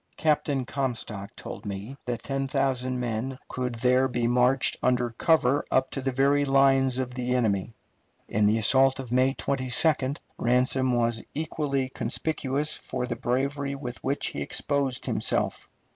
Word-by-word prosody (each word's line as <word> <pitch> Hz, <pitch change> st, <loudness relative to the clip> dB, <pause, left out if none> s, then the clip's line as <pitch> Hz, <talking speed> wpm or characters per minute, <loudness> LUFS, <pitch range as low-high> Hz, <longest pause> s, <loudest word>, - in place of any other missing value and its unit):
Captain 150 Hz, -4 st, +1 dB
Comstock 115 Hz, -6 st, -4 dB
told -, -, -8 dB
me 100 Hz, +5 st, -6 dB
that 120 Hz, -2 st, -3 dB
ten 135 Hz, 0 st, -2 dB
thousand 130 Hz, -2 st, 0 dB
men 125 Hz, +2 st, -3 dB
could 125 Hz, -1 st, -3 dB
there 125 Hz, +2 st, +3 dB
be 120 Hz, -2 st, -1 dB
marched 125 Hz, +2 st, +3 dB
under 125 Hz, -1 st, +1 dB
cover 145 Hz, +1 st, +2 dB
up 130 Hz, 0 st, +1 dB
to 135 Hz, -, -3 dB
the 135 Hz, 0 st, -1 dB
very 140 Hz, +2 st, +3 dB
lines 135 Hz, -2 st, +3 dB
of 130 Hz, -1 st, -3 dB
the 125 Hz, 0 st, -1 dB
enemy. 110 Hz, -3 st, 0 dB, 0.5 s
In 105 Hz, 0 st, +2 dB
the 110 Hz, +2 st, +3 dB
assault 130 Hz, +4 st, +4 dB
of 130 Hz, -3 st, -7 dB
May 130 Hz, +2 st, +3 dB
22d, 135 Hz, +2 st, +1 dB, 0.2 s
Ransom 125 Hz, +1 st, +2 dB
was 115 Hz, -1 st, +1 dB
equally 145 Hz, -3 st, -1 dB
conspicuous 140 Hz, +3 st, -2 dB
for 125 Hz, -1 st, -4 dB
the -, -, -3 dB
bravery 140 Hz, +3 st, -1 dB
with 125 Hz, -3 st, -7 dB
which 140 Hz, +2 st, 0 dB
he -, -, -6 dB
exposed 140 Hz, -4 st, -1 dB
himself. -, -, -1 dB
130 Hz, 150 wpm, -26 LUFS, 125-135 Hz, 0.5 s, assault